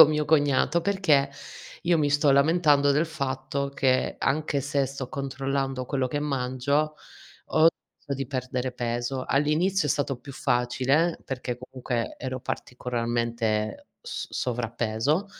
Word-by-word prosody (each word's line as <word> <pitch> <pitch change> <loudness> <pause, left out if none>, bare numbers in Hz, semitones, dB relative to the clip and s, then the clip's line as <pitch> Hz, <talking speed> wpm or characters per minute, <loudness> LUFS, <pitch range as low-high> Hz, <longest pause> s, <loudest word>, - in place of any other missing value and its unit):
con - - +11
mio 150 0 +1
cognato 145 +1 +3
perché 170 -7 +3 0.5
io 170 -1 +3
mi 150 -1 +2
sto 145 0 +4
lamentando 145 0 +4
del 150 +3 +3
fatto 140 -2 -3
che, 130 -2 +1
anche 150 -1 0
se 140 0 0
sto 135 -1 -6
controllando 135 -1 -2
quello 135 -1 0
che 145 +3 -2
mangio, 140 +2 0 0.5
ho 160 +1 +4
smesso 145 -3 -7
di 135 -1 -3
perdere 130 -1 -2
peso. 120 +2 -2
All'inizio 155 +5 +2
è - - +2
stato 140 -1 0
più 140 - -10
facile 135 +5 +1
perché 125 -2 -4
comunque 125 -2 -4
ero 130 0 -4
particolarmente 115 -4 -2
s - - -5
sovrappeso 120 - -1
135 Hz, 130 wpm, -26 LUFS, 125-145 Hz, 0.5 s, con